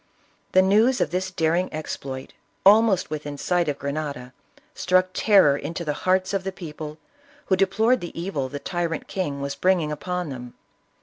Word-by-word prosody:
The 185 - +6
news 220 +7 +4
of 150 - 0
this 185 +1 -1
daring 175 0 0
exploit 135 -4 -6 0.3
almost 205 -4 +5
within 145 -1 -5
sight 175 +1 0
of 145 - -2
Grenada, 140 -3 -4 0.4
struck 185 -6 +2
terror 195 -11 +5
into 170 +4 -5
the 150 - 0 0.2
hearts 185 +1 +2
of 195 -1 0
the 195 - -3
people, 155 -4 -8 0.5
who 190 - +2
deplored 220 +6 +2
the 175 -1 -7
evil 160 -7 -3
the 145 - -5
tyrant 170 +1 -3
king 145 -7 -3
was 140 0 -3
bringing 180 -4 +1
upon 180 +2 -3
them. 125 -2 -8
175 Hz, 165 wpm, -24 LUFS, 150-190 Hz, 0.5 s, The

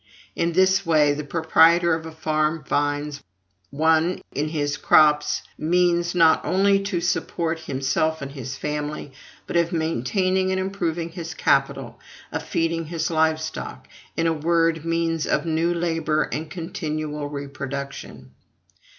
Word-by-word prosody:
In 170 0 0
this 190 +2 +3
way, 155 -4 +3
the 150 +1 -4
proprietor 165 +3 +4
of 160 0 -3
a - - -8
farm 155 0 -1
finds: 145 +1 -1 0.5
1. 160 - +2
In 150 +2 -1
his 145 -2 -1
crops, 150 0 +4 0.2
means, 175 +1 +2
not 165 -2 +5
only 195 +1 +3
of 175 -3 -1
supporting 165 -2 -1
himself 140 +4 0
and 140 0 -6
his 135 -1 -6
family, 150 -1 -4 0.3
but - - -6
of 170 0 +2
maintaining 185 - 0
and 190 0 0
improving 175 -3 -2
his 165 -1 -7
capital, - - 0 0.3
of - - -3
feeding 165 0 -1
his 165 +1 -2
live 160 0 +2
stock 160 0 -6 0.3
in 165 - +1
a 165 - +3
word, 165 0 +1
means 165 -1 0
of - - 0
new 165 +1 +1
labor 165 -3 0
and 155 +1 -5
continual 155 -3 -4
reproduction; 140 - -6 0.5
2. - - -32
160 Hz, 140 wpm, -23 LUFS, 150-170 Hz, 0.5 s, not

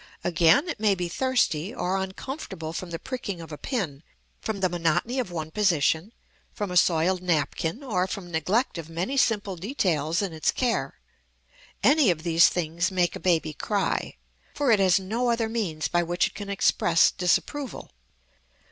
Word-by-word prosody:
Again, 175 - +4
it 335 - -4
may 210 -2 +3
be 175 -1 -3
thirsty, 200 - 0
or 185 +2 -1
uncomfortable 190 - -5
from 180 +1 -5
the 165 - -4
pricking 235 -5 -5
of 165 -1 -9
a 150 - -6
pin, 175 - -3 0.4
from 220 -3 -4
the 190 - +2
monotony 175 +8 0
of 245 - -2
one 160 -2 -5
position, 170 -1 +1 0.4
from 205 -4 -4
a - - -4
soiled 180 +1 +3
napkin, 170 - -1
or 185 -8 0
from 185 -2 -6
neglect 185 - 0
of 165 -1 -8
many 175 +11 -3
simple 210 -7 +1
details 175 - 0
in 190 -4 -3
its 155 - 0
care. 245 -2 -1 0.9
Any 290 -5 +5
of 160 -3 0
these 170 -1 +5
things 170 +1 -1
make 180 -3 0
a - - -6
baby 165 -4 +1
cry, 200 +6 -2 0.4
for 285 -4 +2
it 215 - +5
has 190 -1 +4
no 225 +6 -1
other 230 -1 +1
means 180 -10 -2
by 175 - +1
which 175 +1 +1
it - - -4
can 200 -1 -7
express 175 -3 +3
disapproval. 255 +9 -1
185 Hz, 170 wpm, -26 LUFS, 165-220 Hz, 0.9 s, Any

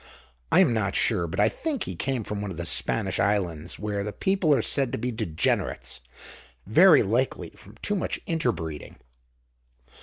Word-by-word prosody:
I 185 - +6
am 150 -11 +3
not 110 -3 -1
sure, 85 - +1
but 95 +5 -5
I 105 - +5
think 300 - -3
he - - -6
came 130 -4 -2
from 105 0 -5
one 105 - -4
of 90 - -7
the 85 - -4
Spanish 95 +2 +1
islands, 90 -6 -1
where 105 -1 -3
the 105 - -4
people 190 - 0
are - - 0
said 135 -3 +4
to - - -1
be 125 +3 -3
degenerates, 85 - -2 0.6
very 160 - +6
likely 120 +6 -1
from - - -17
too 205 - 0
much 190 - -2
inter 160 -7 0
breeding. 80 -7 -7
110 Hz, 180 wpm, -25 LUFS, 95-135 Hz, 0.6 s, I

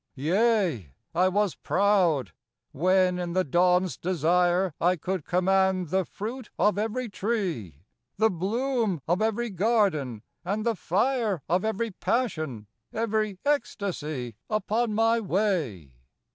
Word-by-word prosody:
Yea, 170 - +1 0.2
I 180 +3 +3
was 200 0 +1
proud, 180 - +2 0.4
when 185 +3 +2
in 175 -1 -3
the 185 +1 +2
dawn's 180 +3 +2
desire 175 +1 +1
I 180 +2 +3
could 180 0 -3
command 185 -1 +2
the 190 +1 +1
fruit 230 +6 -6
of 205 0 +2
every 225 +4 -2
tree, 185 - -3 0.3
The 220 +2 +3
bloom 215 - -1
of 175 +5 +1
every 225 +1 0
garden, 185 - +1 0.2
and 205 +5 -2
the 230 -1 +1
fire 205 - 0
Of 180 +3 +1
every 220 +1 -1
passion, 155 - -2 0.3
every 215 -3 -1
eestacy 155 - -2 0.2
Upon 215 +1 0
my 225 +1 +3
way. 175 - -1
190 Hz, 120 wpm, -27 LUFS, 170-215 Hz, 0.4 s, I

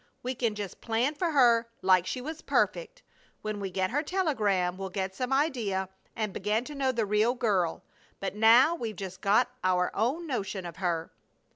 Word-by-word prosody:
We 255 +1 -2
can 230 -4 -1
just 205 -3 -6
plan 235 +5 0
for 340 +3 -1
her 240 -6 +4
like 185 -1 +4
she 255 - -3
was 315 +4 -6
perfect. - - -1 0.4
When 215 -1 -3
we 195 -1 -3
get 185 +1 -1
her 290 +4 +1
telegram 215 - 0
we'll 190 0 -5
get 190 0 -3
some 250 +6 -3
idea, 235 - 0 0.3
and 215 -3 -2
begin 210 +5 0
to 295 - -8
know 270 -2 +1
the 235 -3 0
real 210 +4 +2
girl, 200 -9 0 0.4
but 195 - -3
now 230 +8 +6
we've 230 -10 -4
just 190 -1 -7
got 225 +5 +3
our 180 -1 +2
own 265 +11 0
notion 200 - -3
of 170 - -8
her." 170 -3 -2
220 Hz, 185 wpm, -29 LUFS, 190-260 Hz, 0.4 s, now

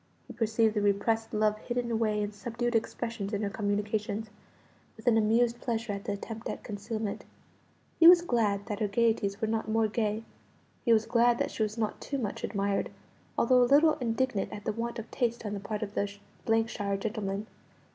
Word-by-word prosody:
He - - -10
perceived 225 -1 +2
the 210 - 0
repressed 220 +3 +1
love 215 -1 +1
hidden 240 0 -2
away 215 -2 +1
in 205 - -3
subdued 240 +3 -3
expressions 225 -2 -2
in 205 +1 -1
her 200 - -1
communications, 210 0 -2 0.7
with 220 - -14
an 240 - +5
amused 230 +2 +2
pleasure 230 -2 -2
at 200 +2 -6
the 205 - -1
attempt 225 +3 -6
at - - -5
concealment. 215 0 -4 0.8
He 330 - +9
was 345 0 +9
glad 210 - +1
that 210 -2 -4
her 215 - +1
gaieties 205 -2 +1
were 220 - +1
not 220 0 -1
more 225 0 +2
gay; 215 0 -1 0.6
he 235 - +2
was 225 -1 +4
glad 240 0 +3
that - - -1
she - - -5
was 215 +1 0
not 215 -2 -2
too 280 - -3
much 215 -6 -4
admired, 200 -1 -1 0.5
although 250 +1 +5
a 245 - +4
little 305 +3 +6
indignant 235 -3 0
at 205 - -8
the - - +1
want 235 +2 -3
of 225 - -7
taste 235 -2 -1
on 205 - -3
the 205 - -3
part 210 +2 -4
of 205 -1 -6
the 200 - 0 0.6
shire 200 -3 -2
gentlemen. 205 -1 -3
220 Hz, 195 wpm, -29 LUFS, 205-235 Hz, 0.8 s, He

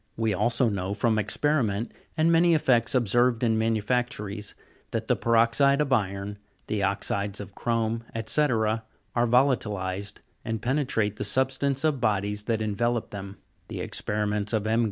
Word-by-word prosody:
We 110 -1 +1
also 120 +6 +2
know, 100 -2 -2
from 110 0 +1
experiment, 115 -1 0 0.3
and 160 +1 +3
many 170 0 +5
effects 130 -5 +2
ob 120 -3 +2
served 120 +2 +2
in 115 -2 +3
manufactories, 110 -2 -1 0.3
that - - -3
the - - +3
peroxide 115 +5 +3
of 145 -3 +1
iron, 100 -2 -1 0.3
the 105 -1 -2
oxides 100 +1 -1
of 100 -2 -8
chrome, 115 0 -1 0.2
&c., 150 - +2
are 110 -5 +1 0.5
vola'tilized, 105 -6 +1 0.3
and 110 0 -3
penetrate 120 -5 0
the - - -2
substance 135 +1 +1
of 150 -5 +1
bodies 105 -2 0
that 110 -2 0
envelope 115 +2 -1
them. 100 -1 -7 0.3
The - - -6
experiments 105 0 -2
of 110 -2 0
M. 110 +1 +2
110 Hz, 150 wpm, -26 LUFS, 105-125 Hz, 0.5 s, many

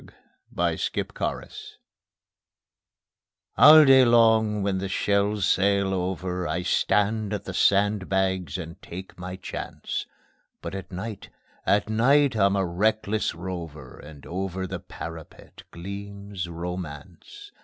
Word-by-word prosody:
_ - - -16 0.5
Over - - +2
the - - -2
Parapet - - -5 1.8
All 155 +1 +9
day 135 -1 +7
long 110 -3 +4
when 95 -1 0
the 95 0 -4
shells 100 +1 +1
sail 100 0 +2
over 90 -1 -2
I 85 +3 -2
stand 105 +3 +1
at 105 - -3
the 95 - -7
sandbags 95 -2 +1
and 85 +1 -8
take 95 +1 -10
my 90 +1 -6
chance; 95 - -6 0.5
But - - -7
at 95 -1 -7
night, 100 +3 -6 0.4
at 105 +1 +3
night 130 +5 +3
I'm 100 -2 +3
a 95 -1 +1
reckless 105 +4 0
rover, 85 -7 -7
And 75 -2 -13
over 95 +1 -4
the 95 - -5
parapet 80 -1 -10
gleams 100 0 -7
Romance. 90 - -8
95 Hz, 120 wpm, -25 LUFS, 90-105 Hz, 1.8 s, All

